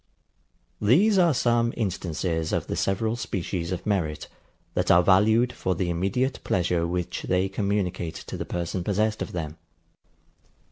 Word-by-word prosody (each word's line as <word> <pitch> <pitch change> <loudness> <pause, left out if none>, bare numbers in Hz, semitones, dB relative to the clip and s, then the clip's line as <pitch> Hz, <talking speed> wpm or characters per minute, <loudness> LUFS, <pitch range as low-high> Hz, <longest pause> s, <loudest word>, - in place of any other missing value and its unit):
These 185 - +4
are 175 -2 +5
some 120 -3 +1
instances 85 -5 -2
of - - 0
the - - -3
several 110 +4 0
species 90 -6 -3
of 90 - -4
merit, 85 -8 -1 0.5
that - - 0
are 90 - +6
valued 110 +6 +4
for 95 - -1
the 85 +1 -1
immediate 100 +10 0
pleasure 85 -2 +1
which 90 0 -3
they 95 +1 +2
communicate 95 -4 -2
to - - -7
the - - -3
person 90 +1 -3
possessed 105 +3 0
of - - -3
them. 80 -2 -5
95 Hz, 145 wpm, -26 LUFS, 85-110 Hz, 0.5 s, are